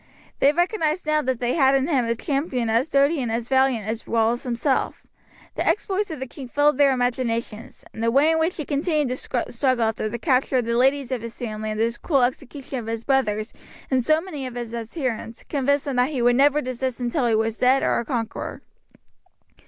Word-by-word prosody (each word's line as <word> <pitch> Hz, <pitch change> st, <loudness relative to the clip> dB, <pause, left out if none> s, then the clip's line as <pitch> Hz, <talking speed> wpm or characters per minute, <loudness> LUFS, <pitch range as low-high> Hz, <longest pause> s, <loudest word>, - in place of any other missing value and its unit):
They 280 Hz, -, +5 dB
recognized 345 Hz, 0 st, 0 dB
now 305 Hz, 0 st, +2 dB
that 260 Hz, -3 st, -1 dB
they 245 Hz, +1 st, -1 dB
had 270 Hz, -4 st, +4 dB
in 270 Hz, +1 st, +1 dB
him 270 Hz, -7 st, +1 dB
a 230 Hz, 0 st, 0 dB
champion 265 Hz, -3 st, -1 dB
as 235 Hz, +7 st, +1 dB
doughty 280 Hz, +2 st, +3 dB
and 240 Hz, -3 st, -2 dB
as 230 Hz, +1 st, -2 dB
valiant 265 Hz, -5 st, +2 dB
as 220 Hz, +1 st, -4 dB
Wallace 230 Hz, +1 st, +1 dB
himself. 255 Hz, +2 st, -1 dB, 0.5 s
The -, -, -2 dB
exploits 405 Hz, 0 st, 0 dB
of 315 Hz, -4 st, -6 dB
the 265 Hz, -, -3 dB
king 265 Hz, +1 st, -9 dB
filled 290 Hz, +2 st, +2 dB
their 280 Hz, -1 st, +6 dB
imaginations, 240 Hz, -3 st, -2 dB
and 220 Hz, -, -7 dB
the 230 Hz, -, +2 dB
way 280 Hz, +6 st, +4 dB
in 320 Hz, -, +1 dB
which 325 Hz, +3 st, 0 dB
he 305 Hz, -, -4 dB
continued 300 Hz, -1 st, 0 dB
the 250 Hz, -1 st, -2 dB
struggle 250 Hz, -1 st, +1 dB
after 220 Hz, -1 st, -1 dB
the 235 Hz, -, -4 dB
capture 260 Hz, 0 st, +1 dB
of 245 Hz, -, +1 dB
the 235 Hz, 0 st, -1 dB
ladies 265 Hz, +1 st, +2 dB
of 255 Hz, -3 st, -2 dB
his 230 Hz, 0 st, -8 dB
family 215 Hz, -2 st, -4 dB
and 215 Hz, 0 st, -3 dB
the 230 Hz, +1 st, +1 dB
cruel 275 Hz, -6 st, +2 dB
execution 265 Hz, +2 st, -3 dB
of 225 Hz, -, -8 dB
his 225 Hz, 0 st, -3 dB
brothers 215 Hz, -5 st, 0 dB, 0.4 s
and 260 Hz, -2 st, +2 dB
so 310 Hz, +5 st, +3 dB
many 310 Hz, -7 st, -6 dB
of 250 Hz, -, -9 dB
his 240 Hz, -1 st, -5 dB
adherents, 230 Hz, -1 st, -4 dB
convinced 285 Hz, 0 st, 0 dB
them 275 Hz, -3 st, -2 dB
that 250 Hz, +2 st, +3 dB
he 265 Hz, -6 st, -2 dB
would 245 Hz, 0 st, +4 dB
never 290 Hz, +3 st, +4 dB
desist 255 Hz, 0 st, -3 dB
until 245 Hz, +1 st, 0 dB
he 225 Hz, -, +2 dB
was 220 Hz, 0 st, -1 dB
dead 260 Hz, +2 st, +4 dB
or -, -, +2 dB
a -, -, -2 dB
conqueror. 230 Hz, -4 st, -4 dB
255 Hz, 215 wpm, -23 LUFS, 235-285 Hz, 0.5 s, their